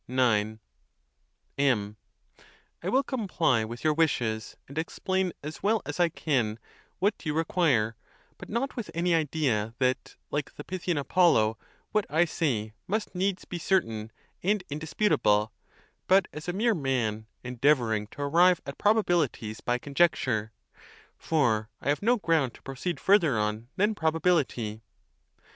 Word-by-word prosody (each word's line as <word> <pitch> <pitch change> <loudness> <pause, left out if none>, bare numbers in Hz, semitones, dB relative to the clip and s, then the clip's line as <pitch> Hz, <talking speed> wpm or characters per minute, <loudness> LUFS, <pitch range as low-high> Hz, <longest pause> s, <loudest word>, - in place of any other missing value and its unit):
1X. 110 -4 +2 1.0
MZ. 105 -7 +1 0.9
I - - -2
will 265 +2 +3
comply 180 - +1
with 115 +2 -7
your 155 -1 +3
wishes, 120 -9 0
and 140 - -11
explain 185 +3 -1
as 155 +2 -7
well 215 +2 +2
as - - -5
I 175 -1 +4
can 125 -10 0 0.4
what 200 +4 0
you 150 -2 -2
require; 150 -9 +2 0.4
but - - -10
not 245 +5 -2
with 235 -4 -5
any 170 +1 +1
idea 140 -9 0
that, 130 0 -1 0.2
like 145 -1 -3
the 145 - -8
Pythian 180 -2 -2
Apollo, 140 -8 +3 0.4
what 215 -2 +1
I 160 +4 +3
say 120 -11 -1
must 210 +1 -2
needs 190 +1 -1
be 175 - -5
certain 115 - 0 0.3
and 200 +1 +1
indisputable, 145 - +1 0.5
but 190 0 +5
as 150 - -7
2 175 - -1
mere 225 +4 +2
man, 120 - -1 0.2
endeavoring 120 -4 +1
to 145 - -7
arrive 175 +4 +4
at 140 - -7
probabilities 175 - +1
by 120 0 0
conjecture, 130 -6 +1 0.6
for 115 -9 +1
I 140 - -3
have 145 - +1
no 240 +4 +3
ground 160 - +1
to - - -18
proceed 135 +6 -4
further 170 - +4
on 105 +2 -1
than 210 +3 +2
probability. 160 - 0
150 Hz, 140 wpm, -28 LUFS, 115-180 Hz, 1.0 s, but